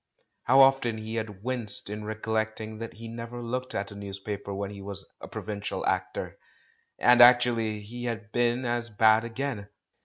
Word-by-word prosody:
How 135 +2 +7
often 135 -4 +4
he 110 +1 -6
had 105 -3 -4
winced 120 -4 -1
in 105 +1 -5
recollecting 110 0 -3
that 115 0 -6
he 115 +1 -9
never 115 +1 -7
looked 125 +2 -4
at 100 +1 -2
a - - -9
newspaper 100 0 -6
when 100 0 -3
he 100 -1 -9
was 100 0 -5
a - - -7
provincial 105 -1 -4
actor! - - -2 0.6
And 125 0 +6
actually 120 -3 +5
he 120 +4 -7
had 115 -2 -4
been 120 +2 +1
as 120 0 -1
bad 110 +1 +4
again. 115 -3 -4
110 Hz, 165 wpm, -28 LUFS, 105-120 Hz, 0.6 s, How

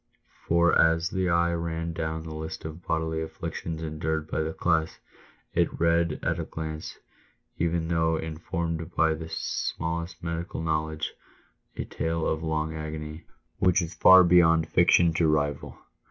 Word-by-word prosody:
For, 85 0 +4
as 80 +1 +2
the 95 -1 0
eye 85 0 +2
ran 85 0 -3
down 80 -1 -3
the 80 -1 -7
list 80 0 -6
of 80 +2 -7
bodily 80 0 -1
afflictions 80 0 -5
y - - -3
endured 80 0 -2
by - - 0
the 80 0 -2
class, 80 -1 0 0.6
it - - 0
read 85 -1 +2
at - - 0
a - - -1
glance, 80 -1 -6 0.6
even 85 0 0
though 80 -1 +1
informed 80 +1 -4
by 80 0 +3
the 80 +1 -7
smallest 85 +2 -3
medical 85 0 -4
knowledge, 80 -1 -2 0.6
a - - -2
tale 80 0 -2
of 80 - -1
long 80 0 -1
agony, 75 0 -6 0.3
which 90 -2 +4
is 85 0 -3
far 95 0 +8
beyond 80 -2 +5
fiction 85 -1 +4
to 80 0 +2
rival. 75 -2 -1
80 Hz, 155 wpm, -27 LUFS, 80-85 Hz, 0.6 s, far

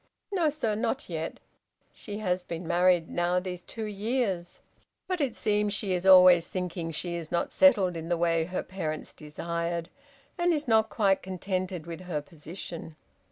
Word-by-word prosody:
"No, 350 -6 +2
sir, 275 -8 -1
not 230 +3 -2
yet; 165 -1 -4 0.5
she 205 - -7
has 185 -4 -1
been 170 -1 -6
married 175 -1 +3
now 175 +1 +1
these 180 -1 -5
two 225 +5 -7
years, 205 -4 -2 0.5
but 365 -3 -1
it 265 -5 0
seems 210 -1 +1
she 195 -3 -1
is 180 +1 -1
always 180 -2 +8
thinking 180 -2 -3
she 170 +2 -3
is 170 -2 -5
not 170 - 0
settled 205 -11 +5
in 165 0 -5
the 175 - +1
way 165 -1 +2
her 180 +2 -3
parents 160 -5 -4
desired, 170 +2 -4 0.5
and 350 0 +3
is 300 -2 -2
not 220 -1 +4
quite 195 -3 +2
contented 185 -2 -3
with 170 0 -7
her 175 -4 -3
position." 160 +2 -9
180 Hz, 165 wpm, -28 LUFS, 170-210 Hz, 0.5 s, always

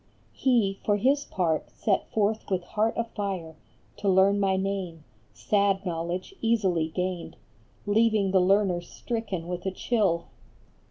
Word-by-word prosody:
He, 225 -7 +1
for 205 -1 +2
his 275 +6 +2
part, 165 -4 -1
set 200 -3 -1
forth 215 0 0
with 185 -2 0
heart 215 +5 0
afire 200 -8 -3 0.4
To 200 - 0
learn 195 +2 +4
my 190 -1 +2
name, 190 -4 -3 0.3
sad 195 - +1
knowledge, 175 - -3
easy 195 -8 +2
gained, 180 0 -3 0.5
Leaving 215 -2 +3
the 190 -1 +4
learner 190 -1 +3
stricken 195 -2 -5
with 180 0 -4
a - - 0
chill 190 -5 0
195 Hz, 130 wpm, -27 LUFS, 180-210 Hz, 0.5 s, learn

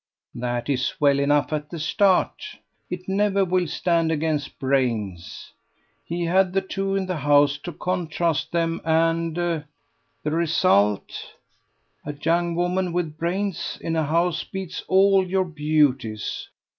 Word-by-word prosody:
"That 120 0 -3
is 130 -2 -1
well 140 -1 +4
enough 145 0 +2
at 150 0 -3
the 170 - -6
start. 185 +4 +2 0.5
It 180 0 -6
never 195 0 +2
will 180 -1 +1
stand 165 0 +1
against 155 -2 -2
brains. 115 -10 -2 0.5
He 170 +7 -3
had 185 +2 +2
the 195 - +2
two 195 0 -2
in 195 -1 0
the 185 -2 -3
house 145 0 +3
to 175 - -6
contrast 170 -1 -1
them, 165 -1 0
and... 165 0 +1
the 170 -3 -1 0.6
result! 155 - +1 0.7
A 145 - -5
young 170 +3 0
woman 180 +1 0
with 170 -4 -2
brains 190 +3 -2
in 165 - -3
a 160 - +1
house 170 +2 +1
beats 190 -3 -6
all 195 0 +5
your 185 +1 0
beauties. 150 - 0
165 Hz, 135 wpm, -23 LUFS, 145-180 Hz, 0.7 s, all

